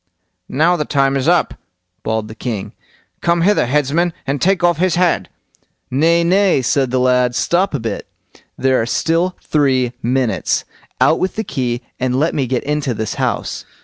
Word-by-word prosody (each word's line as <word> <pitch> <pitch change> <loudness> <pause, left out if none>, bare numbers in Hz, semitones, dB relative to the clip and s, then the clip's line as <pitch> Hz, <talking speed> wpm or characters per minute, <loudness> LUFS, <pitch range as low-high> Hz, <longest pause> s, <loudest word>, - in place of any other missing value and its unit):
"Now 160 +6 +3
the 150 - 0
time 140 -2 +1
is 135 +1 -1
up", 175 0 +3 0.5
bawled 110 -1 -2
the 110 - -9
king; 110 -3 -5 0.5
"come 170 0 +2
hither, 195 -7 +3
headsman, 150 +5 +1
and 140 0 -2
take 190 0 +2
off 175 -2 +3
his 185 0 +2
head." 170 - +1 0.6
"Nay, 165 +6 +3
nay!" 185 -4 +3
said 135 +1 +1
the 130 - 0
lad; 125 -1 +2
"stop 180 +3 +1
a - - -1
bit, 110 -3 -4 0.5
there 130 -2 +2
are 115 - -2
still 165 +7 0
three 130 -5 +1
minutes! 125 -1 0 0.3
Out - - +4
with 185 - -1
the 220 - -2
key, 125 - -3 0.2
and 125 0 0
let 160 +3 +1
me 135 -3 -1
get 125 0 -1
into 145 -4 -1
this 110 0 -3
house." - - -2
140 Hz, 175 wpm, -17 LUFS, 125-170 Hz, 0.6 s, Out